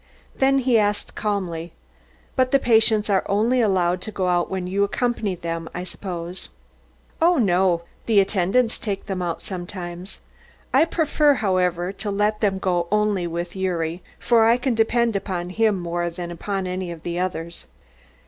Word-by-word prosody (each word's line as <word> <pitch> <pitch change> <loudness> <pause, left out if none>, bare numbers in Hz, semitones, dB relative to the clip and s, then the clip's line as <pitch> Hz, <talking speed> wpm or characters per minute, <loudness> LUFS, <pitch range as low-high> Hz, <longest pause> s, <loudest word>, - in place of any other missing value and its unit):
Then 270 0 +3
he 250 -3 +3
asked 205 0 -1
calmly: 175 -6 -3 0.6
"But 255 -1 +3
the 275 - +5
patients 220 -4 +3
are 195 -2 +2
only 225 +5 +2
allowed 185 -4 +2
to 215 - -5
go 185 -3 -1
out 175 -1 +1
when 190 -1 -3
you 195 +2 +1
accompany 215 -2 -1
them, 165 -1 -5
I 180 - -3
suppose?" 180 -1 -6 0.7
"Oh, 345 +1 +5
no; 180 -6 +2 0.2
the 220 -3 +5
attendants 195 +5 +1
take 200 -3 -4
them 190 -3 -3
out 170 -2 -3
sometimes. 180 0 -7 0.5
I 275 +5 +6
prefer, 305 -3 +2
however, 180 -4 0
to 200 +1 -5
let 210 +1 0
them 200 -3 +2
go 175 -2 0
only 210 -4 +1
with 170 +1 -4
Gyuri, 175 -3 -2 0.2
for 230 -2 +3
I 230 +2 +5
can 250 0 0
depend 230 0 +2
upon 180 -3 -3
him 215 -1 +2
more 175 0 -2
than 175 0 -6
upon 195 +3 -3
any 185 0 -3
of 165 -2 -9
the 175 0 -3
others." 170 - -4
190 Hz, 165 wpm, -23 LUFS, 175-220 Hz, 0.7 s, I